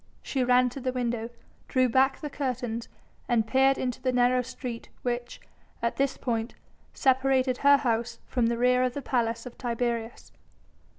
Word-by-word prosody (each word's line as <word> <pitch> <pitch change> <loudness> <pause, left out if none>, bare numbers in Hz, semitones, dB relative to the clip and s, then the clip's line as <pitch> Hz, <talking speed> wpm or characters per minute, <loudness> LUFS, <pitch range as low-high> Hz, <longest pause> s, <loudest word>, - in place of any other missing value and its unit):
She 265 -2 -1
ran 250 0 +4
to 260 - -8
the 255 0 -1
window, 240 -2 -2 0.4
drew 255 -1 +3
back 265 +3 +2
the 300 - -4
curtains 245 -5 -3 0.4
and 230 -3 +3
peered 265 +3 +3
into 255 0 -3
the 255 - +1
narrow 250 0 +3
street 245 -1 -7
which, 240 0 -3 0.4
at 235 - -1
this 275 0 0
point, 230 -1 -2 0.4
separated 260 -1 +2
her 280 0 +6
house 235 -3 -1
from 240 -2 0
the 235 0 0
rear 250 +1 +3
of 255 -1 0
the 285 - -4
Palace 230 -2 -1
of 250 - -10
Tiberius. 235 -1 -3
250 Hz, 165 wpm, -27 LUFS, 235-260 Hz, 0.4 s, her